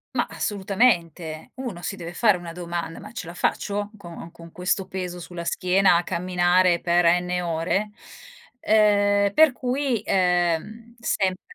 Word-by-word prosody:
Mah, - - +1
assolutamente. 180 -6 -1
Uno 245 -10 -6
si 195 - -4
deve 170 -2 -8
fare 210 -1 +3
una 175 -1 -8
domanda: 170 -1 -5
"Ma - - -11
ce 235 - -6
la 170 - -8
faccio 205 +3 -1
co 170 -3 -10
con 165 -1 -14
questo 185 +2 -1
peso 180 -2 -5
sulla 175 0 -7
schiena 185 +1 +3
a 175 - +2
camminare 180 0 +2
per 175 0 +2
N 180 0 -2
ore?" 170 +4 -1 0.7
Ehm, 205 -2 +3
per 310 -1 +6
cui, 255 -3 -1
ehm, 180 +5 0
sempre 190 -4 -1
180 Hz, 145 wpm, -24 LUFS, 175-205 Hz, 0.7 s, per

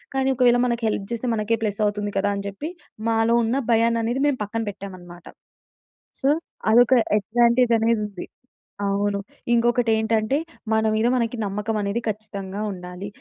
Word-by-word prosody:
కానీ 265 0 +2
ఒకవేళ 245 -1 +5
మనకి 235 -1 -1
హెల్ప్ 200 -2 -2
చేస్తే 235 +2 -3
మనకే 215 +1 +1
ప్లస్ 205 -1 -2
అవుతుంది 205 0 -2
కదా! 195 +1 +2
అని 200 - -4
చెప్పి 200 +10 -6 0.4
మాలో 225 +1 +2
ఉన్న 230 +3 0 0.2
భయాన్ని 230 0 +3
అనేది 240 +4 -1
మేము 285 -3 +1
పక్కన 225 +2 -3
పెట్టామనమాట. 180 -3 -11 1.0
సో, 270 - +3 0.4
అదొక 240 +3 +5 0.3
అడ్వాంటేజ్ 235 +4 +3
అనేది 225 0 +2
ఉంది. 200 -3 -8 0.6
అవును. 200 0 0 0.3
ఇంకొకటి 240 0 +2
ఏంటంటే 220 +3 +1 0.4
మన 220 0 +2
మీద 220 +2 +2
మనకి 235 -1 -1
నమ్మకం 210 +2 -2
అనేది 205 +3 -1
ఖచ్చితంగా 200 -2 -5
ఉండాలి. 180 +1 -7
220 Hz, 150 wpm, -23 LUFS, 200-235 Hz, 1.0 s, ఒకవేళ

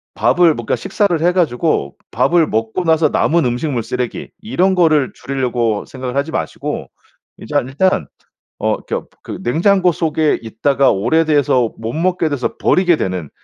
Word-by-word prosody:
밥을 175 -2 +3
뭐 120 - -6
그러니까 - - 0
식사를 200 -6 0
해 175 +2 +3
가지고 155 - 0 0.2
밥을 155 +7 +2
먹고 110 +10 -2
나서 160 -2 +3
남은 170 +3 +2
음식물 125 0 -1
쓰레기 125 +1 -4
이런 190 -3 +1
거를 155 -6 +3
줄이려고 120 -5 -2
생각을 130 -1 -6
하지 145 +3 -1
마시고 - - -4 0.5
이제 - - -8
아 - - +4
일단 145 +9 0 0.5
어 - - 0
그러니까 - - -4 0.2
그 - - -7
냉장고 180 - +3
속에 155 -1 0
있다가 130 +5 +1
오래돼서 130 +1 +2
못 115 +1 -5
먹게 175 +1 0
돼서 140 -4 -2
버리게 180 -2 +3
되는 90 - -3
145 Hz, 345 characters per minute, -17 LUFS, 120-170 Hz, 0.5 s, 아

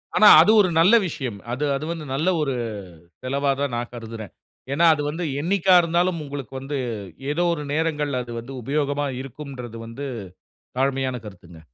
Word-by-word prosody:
ஆனா, 215 - +7
அது 190 - +5
ஒரு 185 - +2
நல்ல 185 +7 +6
விஷயம். 130 -10 -5
அது, 135 +5 -1
அது 145 +3 -4
வந்து 165 -3 -5
நல்ல 155 +6 -1
ஒரு 140 -3 0 0.7
செலவா 140 +2 0
தான் 140 -4 -1
நான் 120 0 -4
கருதுறேன். 115 -2 -8 0.4
ஏனா, 170 +4 +3
அது 150 - -2
வந்து 165 +4 -4 0.2
என்னைக்கா 185 +2 +3
இருந்தாலும், 170 +1 +1
உங்களுக்கு 140 -3 -7
வந்து 135 +2 -4 0.5
ஏதோ 175 +4 +1
ஒரு 150 - -4
நேரங்கள்ல 150 -4 0
அது 120 - -8
வந்து 125 +4 -9
உபயோகமா 145 +2 -1
இருக்கும்ன்றது 130 -3 -8
வந்து 125 +5 -6 0.7
தாழ்மையான 135 -1 0
கருத்துங்க. 90 -5 -12
140 Hz, 160 wpm, -23 LUFS, 125-160 Hz, 0.7 s, ஆனா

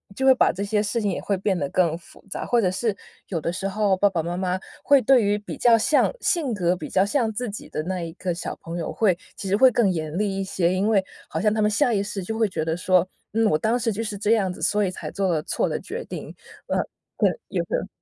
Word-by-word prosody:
就 265 - -1
会 265 - +8
把 - - +3
这 190 +3 -4
些 210 +1 +1
事 215 +3 -1
情 205 -2 0
也 - - -3
会 200 -2 -1
变 195 0 0
得 140 - -1
更 170 -3 +2
复 170 - -18
杂， - - -4
或 240 - +2
者 185 - +2
是 215 +1 -1 0.3
有 170 - -2
的 165 - -2
时 195 +2 -3
候 200 -1 +1
爸 205 +1 +4
爸 170 -4 -1
妈 175 +1 -3
妈 185 0 -1 0.2
会 280 +3 +5
对 250 -1 +5
于 205 +1 +2
比 210 - -7
较 235 -2 +5
像 285 +7 +3
性 305 -9 +1
格 180 -3 +1
比 180 - -7
较 190 +1 +3
像 225 0 +1
自 245 +1 -3
己 200 - -8
的 155 - -3
那 185 +1 -3
一 165 -1 -5
个 180 0 -3
小 170 - -5
朋 165 +1 -6
友 165 - -3
会 200 -6 +2 0.2
其 195 - -6
实 195 - +2
会 260 +1 +7
更 215 -5 +3
严 160 -1 -3
厉 200 -2 0
一 195 - 0
些， 185 -2 0
因 195 +3 +1
为 205 -4 +3 0.2
好 160 - -3
像 210 +4 +2
他 215 - 0
们 210 - +3
下 245 +3 +2
意 200 - +2
识 200 -2 -4
就 220 +4 -4
会 220 - +4
觉 160 -3 -2
得 160 0 0
说， 185 0 +2 0.3
嗯， 225 0 +2
我 155 - +3
当 220 +8 +1
时 230 -1 0
就 220 - -3
是 210 -2 -4
这 210 +2 0
样 200 -5 +3
子， - - -10
所 210 0 +2
以 - - 0
才 - - -7
做 195 -1 -1
了 155 -3 0
错 - - 0
的 - - -2
决 - - -6
定， - - -7 0.4
嗯， - - 0 0.4
对， - - +4 0.2
也 - - 0
会 - - -14
有 - - -5
200 Hz, 305 characters per minute, -24 LUFS, 180-220 Hz, 0.4 s, 会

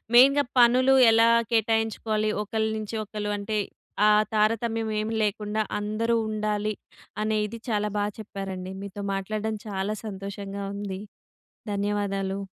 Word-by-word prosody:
మెయిన్‌గా 275 +3 +7 0.2
పనులు 255 +3 +6 0.2
ఎలా 230 +1 +5 0.2
కేటాయించుకోవాలి, 220 -1 +1
ఒకళ్ళ 220 +1 -1
నుంచి 215 +1 -5
ఒకళ్ళు 210 0 -4
అంటే, 210 +1 -2 0.5
ఆ - - +7 0.2
తారతమ్యం 225 +1 +1
ఏమి 215 +1 -2
లేకుండా 210 +1 -1 0.2
అందరూ 220 +3 0
ఉండాలి. 215 0 -1 0.5
అనేది 215 +1 -1
చాలా 210 -1 +1
బా 205 - +1
చెప్పారండి. 190 -3 -6
మీతో 200 0 -6
మాట్లాడడం 215 +3 -2
చాలా 200 +1 -2
సంతోషంగా 200 0 -6
ఉంది. 200 -2 -4 0.7
ధన్యవాదాలు. 200 -1 -1
210 Hz, 115 wpm, -26 LUFS, 200-220 Hz, 0.7 s, మెయిన్‌గా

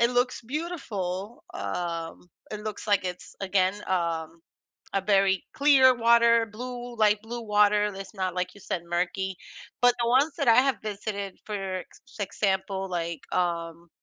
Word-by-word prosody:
it 235 +1 +4
looks 250 +1 +1
beautiful. 230 - -4
Um, 165 - -4 0.2
it 210 - -5
looks 215 -1 -6
like 205 -3 +2
it's 180 -1 -6
again, 190 -1 +2
um, 165 -2 -1 0.5
a 195 - +3
very 195 -2 +3
clear 275 -3 +6
water, 235 -1 +5
blue, 245 +2 -7
light-blue 220 +2 +1
water, 210 -1 +4
it's 195 0 -8
not, 185 -2 -2
like 180 0 -2
you 205 - -15
said, 180 -2 -3
murky. 185 +2 -1 0.5
But 245 0 +7
the 235 - +1
ones 270 +6 +4
that 280 - 0
I 230 - +8
have 265 -1 +4
visited, 200 -2 -4
for 215 - -5 0.2
ex - - -12 0.2
example, 195 -1 -1
like, 170 -3 -3
um, 170 -1 -2
205 Hz, 150 wpm, -27 LUFS, 180-235 Hz, 0.5 s, I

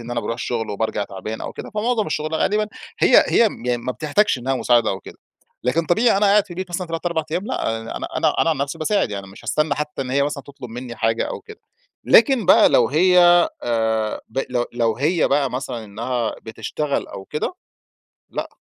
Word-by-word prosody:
إن 120 +1 -9
أنا 120 - -1
باروح 115 +1 -3
الشغل 115 -2 -3
وبارجع 105 0 -2
تعبان 100 +3 -7
أو - - -5
كده، - - -8
فمعظم 215 +1 0
الشغل 155 +1 -2
غالبًا 210 +6 +1 0.3
هي - - +6
هي 230 - +4
م 120 -8 -3
ما 130 - 0
بتحتاجش 155 +4 +1
إنّها 130 +2 -1
مساعدة 120 -3 +3
أو 95 - -4
كده. - - -13 0.5
لكن 160 +6 +1
طبيعي 220 +5 +3
أنا 205 +1 +3
قاعد 200 0 +5
في - - -24
البيت 185 +1 -5
مثلًا 175 +1 -3
3 165 +1 -4
4 170 -2 0
أيّام، 175 +4 -2
لأ، 115 0 -2 0.2
أنا - - -4
أنا - - +1
أنا 165 - +3
عن 160 - 0
نفسي 140 +4 -3
باساعد 165 - +1
يعني 100 -1 -5
مش 95 +1 -14
هاستنى 150 +1 +1
حتّى 150 -1 -3
إن 125 - -6
هي 140 +1 +2
مثلًا 145 -1 -2
تطلب 140 -4 -11
مِنّي 120 0 -7
حاجة 115 +1 +1
أو - - -5
كده. 435 -1 -13 0.4
لكن 260 - +5
بقى - - +7
لو 120 -2 +4
هي، 180 +6 +4 0.4
آآ 110 -2 0
ب 115 - -5
لو 120 -1 0
لو 115 -2 0
هي 160 +5 +1
بقى 140 -1 +2
مثلًا 125 -2 -4
إنّها 115 +3 -3
بتشتغل 140 +6 -3
أو 95 - -8
كده 150 - -3 0.8
لأ، - - -4
135 Hz, 210 wpm, -21 LUFS, 115-170 Hz, 0.8 s, بقى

